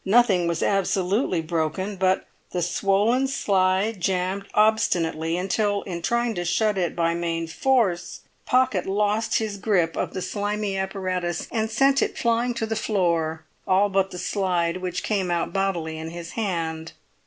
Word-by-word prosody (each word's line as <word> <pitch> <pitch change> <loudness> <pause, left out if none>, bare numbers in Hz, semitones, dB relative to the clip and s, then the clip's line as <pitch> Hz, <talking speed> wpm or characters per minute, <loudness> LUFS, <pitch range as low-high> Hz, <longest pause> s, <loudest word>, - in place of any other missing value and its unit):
Nothing 195 -4 +4
was 170 -1 -1
absolutely 195 -1 +1
broken; 170 +5 -2
but 190 0 +1 0.3
the 180 -1 0
swollen 205 +9 +2
slide 195 -3 +1
jammed 190 +2 -1
obstinately, 170 -6 +2
until 200 +2 0
in 170 -2 -5
trying 235 +4 0
to 175 - -3
shut 210 +5 +1
it 180 -3 -1
by 170 -1 +1
main 165 -1 -2
force, 190 0 0 0.3
Pocket 250 -7 +2
lost 210 +3 +1
his 215 -2 -2
grip 180 -5 +1
of - - -3
the 185 - -2
slimy 205 -1 -2
apparatus, 185 -3 -2
and 220 -1 -1
sent 270 +4 +3
it - - -1
flying 235 +1 +1
to 230 - -1
the 220 0 -2
floor, 170 -7 0 0.2
all 195 +2 +3
but 195 -1 +1
the 180 - -8
slide 180 -3 0
which 185 -1 -4
came 195 -4 0
out 170 -1 -1
bodily 175 -5 -1
in 160 0 -5
his 170 0 -8
hand. 165 -6 -3
190 Hz, 155 wpm, -24 LUFS, 175-210 Hz, 0.3 s, Nothing